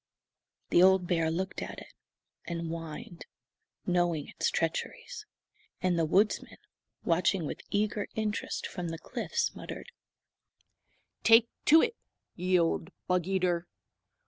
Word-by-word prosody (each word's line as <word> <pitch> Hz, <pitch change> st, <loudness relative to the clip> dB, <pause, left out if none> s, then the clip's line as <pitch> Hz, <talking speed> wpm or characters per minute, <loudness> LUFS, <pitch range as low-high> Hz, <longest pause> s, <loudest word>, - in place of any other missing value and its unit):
The 175 Hz, -, +6 dB
old 190 Hz, 0 st, +6 dB
bear 165 Hz, -2 st, +1 dB
looked 185 Hz, +4 st, -2 dB
at -, -, -6 dB
it, -, -, -11 dB, 0.5 s
and 170 Hz, -1 st, -3 dB
whined, 165 Hz, +4 st, -7 dB, 0.6 s
knowing 175 Hz, -4 st, +1 dB
its -, -, 0 dB
treacheries. 430 Hz, -, -3 dB, 0.5 s
And 180 Hz, -2 st, +1 dB
the 165 Hz, -, +3 dB
woodsman, 205 Hz, +6 st, +2 dB, 0.5 s
watching 175 Hz, +1 st, +2 dB
with -, -, -5 dB
eager 210 Hz, 0 st, 0 dB
interest 215 Hz, -1 st, -2 dB
from 180 Hz, -2 st, -4 dB
the 165 Hz, 0 st, -4 dB
cliffs, 470 Hz, -, -2 dB
muttered: -, -, -8 dB, 1.3 s
"Take 230 Hz, +1 st, +6 dB, 0.2 s
to 320 Hz, +2 st, +7 dB
it, 465 Hz, 0 st, 0 dB, 0.4 s
ye 185 Hz, +1 st, +2 dB
old 165 Hz, 0 st, 0 dB, 0.2 s
bug 180 Hz, -1 st, +1 dB
eater! 180 Hz, -2 st, +1 dB
180 Hz, 120 wpm, -30 LUFS, 170-205 Hz, 1.3 s, to